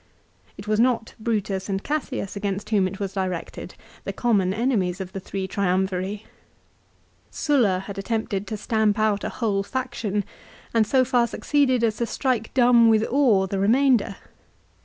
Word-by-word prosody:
It 200 - -10
was 215 0 +1
not 235 -1 +1
Brutus 210 -4 -2
and 195 0 -2
Cassius 280 -9 -3
against 200 +1 -3
whom 200 -3 +3
it 190 +1 -7
was 195 -1 -3
directed, 185 -3 -4 0.3
the - - -3
common 205 -6 +1
enemies 200 -5 0
of 190 -1 -6
the 195 - -4
three 190 0 -5
Triumviri. 190 +1 -1 1.1
Sulla 230 -12 +1
had 200 -1 -6
attempted 205 -2 -2
to 215 - -4
stamp 215 0 +1
out 215 -2 +1
a - - -2
whole 205 -5 -1
faction 220 -3 -3 0.5
and 225 -2 +3
so 260 +2 +3
far 245 -2 +2
succeeded 260 -2 +1
as 220 -2 +1
to 235 - -1
strike 245 -4 -1
dumb 240 -2 +6
with 220 0 +3
awe 240 -8 +4
the 195 +1 -3
remainder. 235 0 +3
210 Hz, 160 wpm, -24 LUFS, 195-240 Hz, 1.1 s, dumb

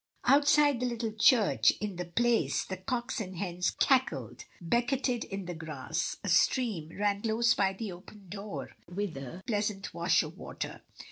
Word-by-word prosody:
Outside 290 -1 +5
the 250 - 0
little 235 -2 -2
church, 220 -1 +5
in 205 -2 -3
the 180 - -3
Place, 235 +7 +1
the 190 - -5
cocks 235 +4 -3
and 190 -2 -6
hens 180 -1 -1
cackled, 260 -2 +1
becketed 240 +6 0
in 195 -1 -5
the 175 - -4
grass; 160 -1 -4
a - - -4
stream 215 - +2
ran 205 0 +1
close 230 +1 +3
by 195 -1 +1
the 200 +1 -5
opened 185 +1 -13
door 200 0 -6 0.2
with 190 -1 -3
a 135 +7 -8
pleasant 210 -3 -2
wash - - +3
of - - -8
water. - - -6
210 Hz, 160 wpm, -30 LUFS, 185-240 Hz, 0.2 s, Outside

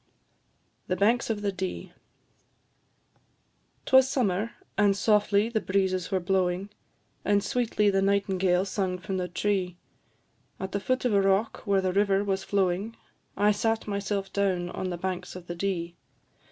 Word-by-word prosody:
THE 185 - 0
BANKS 225 +7 +2
OF 210 -2 -2
THE 200 - +1
DEE. 185 -1 -5 1.9
'Twas 265 0 +5
summer, 220 -4 0 0.2
and 200 -1 +3
softly 210 0 +3
the 225 -2 -1
breezes 190 -2 0
were 190 - +1
blowing, 185 +1 0 0.5
And 205 -1 +2
sweetly 210 -2 +1
the 195 0 +2
nightingale 195 -2 +2
sung 190 -2 -2
from 190 +1 -4
the 180 -1 -2
tree, 180 0 -1 0.8
At 190 0 -4
the 200 - -1
foot 255 +5 -1
of 240 - +2
a 200 - +4
rock 195 +3 +1
where 195 -1 +3
the 185 -1 -1
river 200 0 +2
was 195 -1 -1
flowing, 195 +3 0 0.4
I 205 +1 +4
sat 225 +2 0
myself 200 -1 -3
down 185 -3 0
on 185 - -3
the 175 - -3
banks 180 0 -4
of 180 -1 -9
the 175 - -5
Dee. 175 -2 -2
195 Hz, 155 wpm, -27 LUFS, 185-205 Hz, 1.9 s, Twas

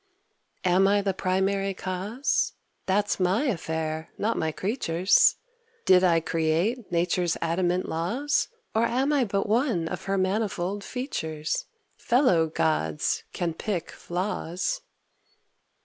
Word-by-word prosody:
Am 185 +2 +4
I 200 0 +3
the 195 -1 0
Primary 195 +1 0
Cause? 195 +9 -1 0.3
That's 205 +2 +1
my 185 +7 +2
affair, 160 - -2
not 225 +2 0
my 160 0 -1
creatures'. 185 - +3 0.5
Did 185 0 +6
I 170 -2 +4
create 165 +9 0
nature's 175 0 +1
adamant 175 +2 0
laws, 240 - 0 0.3
Or 225 +1 +3
am 265 +5 +1
I 275 -4 +3
but 200 -1 -1
one 220 - +1
of - - -5
her 195 0 0
manifold 195 0 -1
features? 160 - -3 0.3
Fellow 235 - +3
gods 155 - 0
can 170 -2 -2
pick 175 0 -3
flaws! 185 - -3
185 Hz, 115 wpm, -26 LUFS, 170-215 Hz, 0.5 s, Did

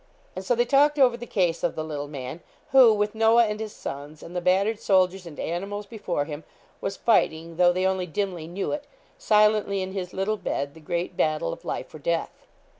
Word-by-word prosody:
And 185 - -5
so 245 +6 +1
they 240 +1 +2
talked 285 +3 +4
over 255 -4 +5
the 240 0 -8
case 175 -4 0
of - - 0
the 155 - -3
little 145 -2 -5
man, 140 +1 -7 0.3
who 260 -4 +8
with 210 0 0
Noah 225 +1 +5
and 210 0 -3
his 220 -1 -5
sons, 145 -1 -8
and 175 - -10
the 180 - -1
battered 195 +5 +2
soldiers 185 -2 +2
and 155 - -10
animals 200 +5 -3
before 200 -9 -3
him, 150 +1 -7 0.4
was 195 - -3
fighting, 165 -7 +1
though 175 0 +5
they 185 +1 0
only 190 -1 0
dimly 180 -2 -3
knew 185 +4 -3
it, 295 -1 -4 0.3
silently 210 -2 +3
in 185 - -5
his 185 -2 -4
little 205 +3 -1
bed, 140 -7 -3
the 160 - -14
great 170 +3 -3
battle 155 - 0
of - - -11
life - - -4
or 155 - -9
death. 165 +3 -3
190 Hz, 210 wpm, -25 LUFS, 165-215 Hz, 0.4 s, who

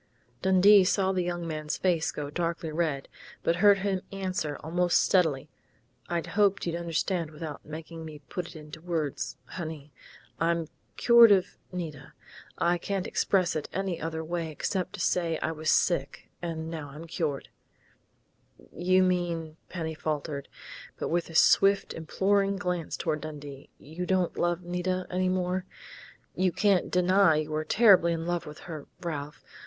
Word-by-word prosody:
Dundee 190 +2 +6
saw 190 0 +2
the 185 -1 0
young 175 -1 -3
man's 155 -1 -3
face 170 -3 +1
go 145 -1 -5
darkly 165 0 -2
red, 155 -4 -1 0.4
but 170 - +2
heard 200 +1 +6
him 190 -1 -1
answer 185 -6 -3
almost 175 +2 +2
steadily: 155 -7 +2 0.6
"I 170 -1 +1
hoped 200 -1 +2
you'd 170 -1 -1
understand 170 0 -1
without 155 -1 -7
making 160 +2 -8
me 155 -1 -8
put 175 +6 -4
it - - -12
into 150 0 -10
words, 155 -7 -3
honey.... 155 -5 -7 0.5
I'm 165 -1 0 0.3
cured 235 -2 +8
of 190 -2 +3 0.2
Nita. 165 -6 -6 0.4
I 175 +1 +2
can't 195 +1 -2
express 185 -4 +1
it 155 - -3
any 190 -2 -2
other 160 0 -3
way 165 0 -3
except 180 +4 -2
to - - -7
say 170 -3 +1
I 160 - -2
was 155 0 -3
sick, 145 -6 +1
and 165 -1 -4
now 155 -3 -6
I'm 150 +4 -9
cured 160 -4 -3 0.7
" - - -27 0.2
"You 185 0 +6
mean 170 -3 -1
" - - -41
Penny 160 -3 -4
faltered, 150 -2 -4 0.5
but - - -3
with 170 0 0
a 165 - -10
swift, 195 +4 +4
imploring 195 +5 +1
glance 180 -3 -3
toward 155 -2 -1
Dundee, 145 -3 -8
" - - -43
you 165 +5 -6
don't 185 -2 +1
love 175 +1 0
Nita 180 +1 -2
any 185 0 +1
more? 185 0 -1 0.7
You 185 0 +1
can't 200 -1 +2
deny 180 -2 +4
you 155 0 -2
were 155 0 -1
terribly 185 -2 +5
in 165 0 -3
love 175 -2 -2
with 150 0 -10
her, 155 -4 -8
Ralph. 150 -4 -5
170 Hz, 160 wpm, -28 LUFS, 155-185 Hz, 0.7 s, cured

